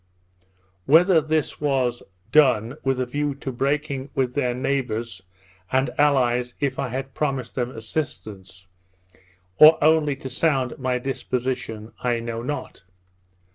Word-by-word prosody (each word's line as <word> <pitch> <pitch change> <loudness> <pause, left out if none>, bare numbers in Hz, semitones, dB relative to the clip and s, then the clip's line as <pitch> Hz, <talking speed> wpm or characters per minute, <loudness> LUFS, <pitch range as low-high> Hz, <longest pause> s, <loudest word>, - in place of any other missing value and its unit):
Whether 165 +3 +6
this 155 -1 -2
was 130 -4 0 0.3
done 125 -5 +4
with 135 -1 0
a 130 - 0
view 145 +2 -2
of 130 -3 -4
breaking 140 -1 -1
with 130 -2 0
their 125 -3 0
neighbours 120 -6 -2 0.5
and 130 +1 +1
allies 125 -4 +2
if 140 -2 -1
I 140 - -1
had 130 +2 -5
promised 135 -5 -2
them 125 -2 -2
assistance, 110 -6 -6 0.9
or 155 +1 +9
only 155 -2 +3
to 135 - -8
sound 130 -1 0
my 130 -1 0
disposition, 125 -4 -4
I 120 -1 0
know 115 0 -4
not. 135 -6 -6
130 Hz, 130 wpm, -23 LUFS, 120-145 Hz, 0.9 s, or